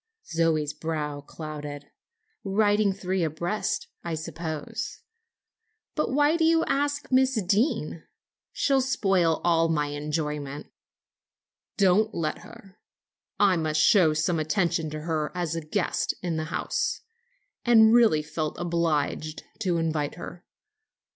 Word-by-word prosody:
Zoe's 160 -3 0
brow 150 -2 -3
clouded. 145 -1 -8 0.5
"Riding 205 +1 +2
three 190 -1 -2
abreast, 175 - -2 0.2
I 170 -1 -3
suppose. 160 -1 -5 0.9
But 305 - -1
why 295 +4 +3
did 325 - +2
you 330 0 +3
ask 285 +1 -1
Miss 260 -2 +3
Deane? 195 - 0 0.5
She'll 275 -1 +2
spoil 195 -11 +1
all 165 -1 +3
my 150 -2 0
enjoyment." 150 -1 -4 1.1
"Don't 205 +2 +3
let 160 -2 -2
her; 195 -1 -15 0.6
I 195 -3 +4
must 155 -1 0
show 165 -2 +5
some 160 +2 +1
attention 165 -1 0
to 155 0 -6
her 155 -2 -2
as 170 -3 -2
a 165 - -2
guest 170 +5 -1
in 175 -2 -1
the 155 0 -2
house, 155 - -2 0.6
and 225 -2 +6
really 220 -11 +5
felt 155 0 -4
obliged 160 -3 -1 0.2
to 185 -6 0
invite 155 -3 -1
her. 175 0 -9
165 Hz, 120 wpm, -26 LUFS, 155-205 Hz, 1.1 s, and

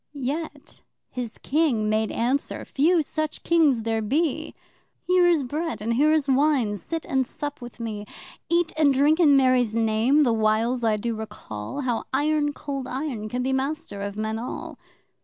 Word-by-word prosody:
Yet 290 +2 -5 0.3
his 245 -3 -5
King 275 -8 +1
made 215 0 +1
answer 255 +5 -1
(few 320 +4 +2
such 310 +1 -3
Kings 300 -9 +3
there 225 0 0
be!) 315 +7 -1 0.5
'Here 360 -1 +4
is 335 -5 +3
Bread 310 +6 -3
and 225 +3 -1
here 295 +6 +3
is 310 -3 +2
Wine 270 -5 +2
sit 325 - -5
and 265 -1 +1
sup 290 +2 -6
with 240 0 -10
me. 210 -3 -5 0.4
Eat 340 -1 +1
and 300 -3 +5
drink 290 +5 +3
in 290 -5 +6
Mary's 255 -4 +3
Name, 230 +6 +3
the 240 -4 +2
whiles 225 +3 +1
I 220 -2 +2
do 230 +2 -2
recall 215 - -6
How 245 -4 -1
Iron 295 +1 +1
Cold 275 -3 -5
Iron 255 -6 -4
can 250 +3 -2
be 265 +1 0
master 270 -5 -3
of 200 0 -5
men 220 +1 -2
all! 240 - -6
265 Hz, 170 wpm, -25 LUFS, 225-300 Hz, 0.5 s, in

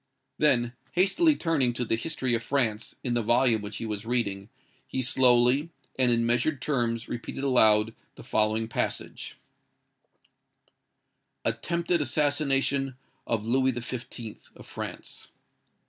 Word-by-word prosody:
Then 120 -5 +3 0.2
hastily 285 - +3
turning 145 - +1
to 120 +1 -2
the 115 - +1
"History 130 0 -2
of 115 - +1
France," 115 -4 -1
in 125 - -1
the 120 - +1
volume 120 0 +3
which 105 0 -6
he - - -5
was 105 -2 -4
reading, 105 -4 -2 0.4
he 130 - -2
slowly 125 +4 +4 0.3
and 125 -2 +4
in 115 0 +2
measured 125 +5 +1
terms 120 -5 -1
repeated 120 +3 -5
aloud 110 -5 +4 0.2
the - - -12
following 110 +1 +1
passage:— - - -4 2.1
"ATTEMPTED 170 0 0
ASSASSINATION 140 -1 +1 0.3
OF 110 -2 -1
LOUIS 130 +1 +1
XV., 120 -3 -7 0.2
OF - - -13
FRANCE. - - -8
120 Hz, 125 wpm, -27 LUFS, 115-135 Hz, 2.1 s, slowly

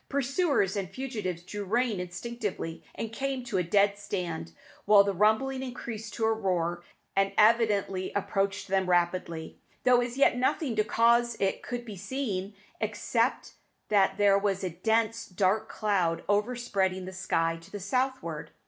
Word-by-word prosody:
Pursuers 275 - +1
and 195 -3 -2
fugitives 205 -7 -4
drew 205 +3 -5
rein 225 +1 0
instinctively, 185 -2 -5
and 225 0 -5
came 270 +1 -2
to 230 -6 -1
a - - +1
dead 200 +3 +2
stand; 175 - -4 0.3
while 205 -1 +7
the 200 0 -1
rumbling 220 +7 +2
increased 235 -4 -6
to 225 - 0
a 225 - +3
roar, 175 -5 -1 0.3
and 195 0 +2
evidently 210 -4 +3
approached 195 0 -1
them 190 -1 +1
rapidly, 175 -2 0 0.2
though 250 -1 +5
as 245 +1 -4
yet 275 -2 +4
nothing 255 0 0
to 215 - +3
cause 235 +1 +3
it 195 -1 0
could 245 -1 -5
be 215 -3 -7
seen, 205 -2 -3 0.2
except - - -1 0.4
that 195 -2 +3
there 200 -1 +5
was 195 -1 -1
a 185 - -2
dense, 225 +5 0
dark 200 +4 +1
cloud 180 -6 0
overspreading 205 -3 0
the 190 - -7
sky 165 -3 0
to 165 - -15
the 205 - -6
southward. 205 - -2
205 Hz, 155 wpm, -29 LUFS, 185-235 Hz, 0.4 s, while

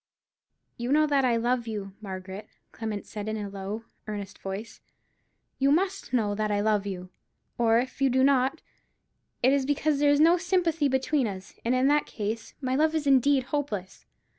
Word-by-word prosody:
"You 240 +2 -3
know 305 +1 +5
that 285 -2 +2
I 245 -2 +3
love 240 +1 0
you, 205 -3 -5
Margaret," 190 0 -7 0.2
Clement 220 -3 -5
said, 210 0 -6
in 220 - -2
a 205 -1 -4
low, 200 +3 -5 0.2
earnest 205 -2 -6
voice; 195 +4 -6 0.8
"you 275 +1 +3
must 375 0 0
know 220 -5 +1
that 215 +1 -1
I 205 -1 +1
love 205 -1 +1
you: 185 -2 -6 0.5
or 230 -1 +4
if 255 +3 -2
you 270 - +4
do 260 +1 +3
not, 270 +2 +2 0.8
it 260 +2 +5
is 280 -1 +2
because 290 +1 +1
there 290 0 +4
is 290 0 +4
no 335 +3 +6
sympathy 345 -4 +1
between 265 0 +1
us, 190 -2 -7
and 240 +2 +1
in 255 +1 +3
that 295 0 +2
case 215 +1 -4
my 260 -1 0
love 315 +3 +2
is 310 -2 -1
indeed 275 0 +4
hopeless. 210 -11 -3
245 Hz, 185 wpm, -27 LUFS, 210-285 Hz, 0.8 s, no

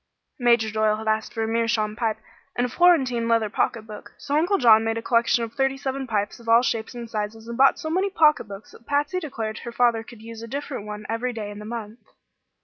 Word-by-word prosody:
Major 235 -3 +3
Doyle 215 0 +2
had 220 +1 -7
asked 220 0 0
for 225 -2 -2
a - - -1
meerschaum 225 -2 0
pipe 225 -2 -1 0.4
and 245 - +1
a - - -3
Florentine 265 -9 +3
leather 225 -2 +2
pocket 225 0 0
book; 215 -1 -11
so 285 - -3
Uncle 350 +6 +2
John 225 -4 +6
made 225 0 -1
a - - -3
collection 235 0 +2
of 225 0 -6
thirty 270 0 0
seven 270 -1 -4
pipes 205 -2 -2
of 230 -1 -9
all 230 +2 +6
shapes 225 -1 -2
and 235 -1 -6
sizes, 220 0 -5
and 235 - -5
bought 270 +2 +5
so 315 - -5
many 380 +4 +1
pocketbooks 300 - +1
that 235 - -18
Patsy 290 +6 0
declared 225 -9 -5
her 235 - -7
father 235 -1 +2
could 225 -1 -13
use 230 0 -9
a 230 - -7
different 270 -4 -5
one 210 0 -7
every 240 +2 -2
day 210 -3 -5
in 205 - -9
the 210 - -9
month. 225 0 -6
230 Hz, 235 wpm, -24 LUFS, 220-255 Hz, 0.4 s, John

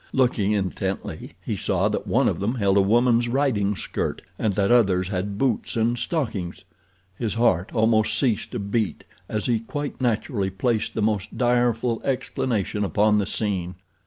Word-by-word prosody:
Looking 120 -6 +2
intently 95 -1 -3
he - - -1
saw - - +1
that - - -3
one - - +3
of - - 0
them 105 +6 -1
held 100 -5 +2
a 100 - +6
woman's 120 +3 +3
riding 120 -6 +1
skirt - - -3 0.2
and 110 - +1
that 100 +3 +1
others 95 -7 +3
had 100 +1 -3
boots 125 -2 0
and 115 +1 +2
stockings. 115 - -3 0.5
His 115 -3 -1
heart 115 -5 +2
almost 110 -1 +3
ceased 120 -4 0
to - - -2
beat 100 +1 -2 0.3
as 105 -1 -2
he 120 -2 +2
quite 145 +5 -5
naturally 110 -4 0
placed 110 +3 -1
the 110 - 0
most 105 -1 -1
direful 120 -1 +1
explanation 120 -6 -1
upon 105 +1 +3
the 100 - -1
scene. 95 -5 -2
110 Hz, 160 wpm, -24 LUFS, 100-120 Hz, 0.5 s, a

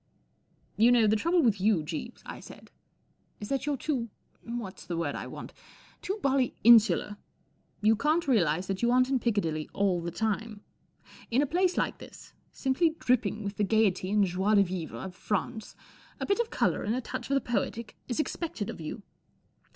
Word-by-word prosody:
'* - - -44 0.3
You 230 +3 +6
know* 240 -2 +5
the 215 +1 +3
trouble 335 +9 +2
with 210 -6 +2
you, 200 -5 +3
Jeeves," 170 +10 -6
I - - -8
said, - - -13 0.3
" - - -42
is 205 - -7
that 275 +1 -1
you're 290 -2 0
too—what's 235 -5 -6
the 170 - -3
word 160 -4 -1
I - - -5
want - - -9 0.5
?—too 390 +3 -3
bally 270 -2 +1
insular. 220 -2 +5 0.6
You 215 +1 +4
can't 305 +8 +1
realize 180 - +2
that 190 0 -3
you 235 - +3
aren't 255 +1 +3
in 265 - +2
Piccadilly 165 -10 -1
all 190 -3 +1
the 170 - -3
time. 220 +2 -3 0.7
In 255 +5 +3
a - - +1
place 360 +5 +1
like - - -1
this, - - -13 0.2
simply 315 +5 +1
dripping 220 -4 0
with 200 0 -5
the 210 - +1
gaiety 200 -3 +2
and 205 0 +3
joie 190 +4 +1
de 200 - +6
vivre 180 -3 -5
of 190 -1 -7
France, 215 +4 -3 0.4
a - - -2
bit 400 +3 +1
of 470 -1 0
colour - - 0
and 215 +3 -1
a 255 - -2
touch - - -6
of 275 - +2
the - - +4
poetic 235 -2 -3
is 245 - -3
expected 305 - -3
of - - -10
you. 160 +7 -6
220 Hz, 190 wpm, -29 LUFS, 195-255 Hz, 0.7 s, You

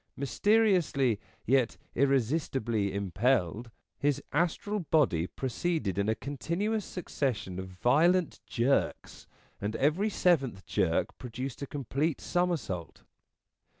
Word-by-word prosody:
Mysteriously 165 - +2 0.3
yet 130 -1 +2 0.2
irresistibly 130 -5 +1
impelled, 100 +2 0 0.3
his 145 0 +1
astral 175 +6 0
N' - - -2
JAWK 165 - -12
35 - - -50
body 105 - +3
proceeded 130 - -2
in 100 +2 +1
a 110 - +2
continuous 175 - -2
succession 125 - -3
of 95 - -5
violent 155 - +2
jerks, 125 +4 0 0.3
and 105 +2 -2
every 155 +10 +2
seventh 135 - +1
jerk 90 -5 0
produced 130 +2 -6
a 140 - -3
complete 140 +3 -1
somersault. 165 - -2
135 Hz, 115 wpm, -30 LUFS, 110-165 Hz, 0.3 s, body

